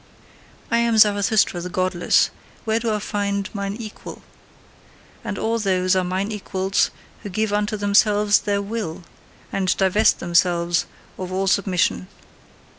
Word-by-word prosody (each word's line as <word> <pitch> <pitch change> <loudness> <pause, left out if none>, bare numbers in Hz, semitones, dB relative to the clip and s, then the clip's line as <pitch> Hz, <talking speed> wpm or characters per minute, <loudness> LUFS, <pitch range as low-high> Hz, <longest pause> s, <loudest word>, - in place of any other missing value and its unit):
I 235 - +3
am 235 -1 +1
Zarathustra 205 -3 +3
the 180 - -5
godless: 185 -1 +1 0.3
where 220 0 +1
do 230 -1 -1
I 215 - 0
find 200 -1 -2
mine 200 -1 -3
equal? 215 -2 -9 1.0
And 200 - -4
all 230 +1 -1
those 185 -3 +1
are 185 - +2
mine 190 +4 -2
equals 195 -2 0 0.3
who 205 - -7
give 215 +2 -1
unto 210 +1 0
themselves 205 0 +3
their 200 -1 -1
Will, 200 -6 -5 0.5
and 190 -2 0
divest 195 +3 +3
themselves 175 0 +1 0.3
of 185 -1 -5
all 190 +1 -1
submission. 185 -1 +1
200 Hz, 135 wpm, -22 LUFS, 185-210 Hz, 1.0 s, I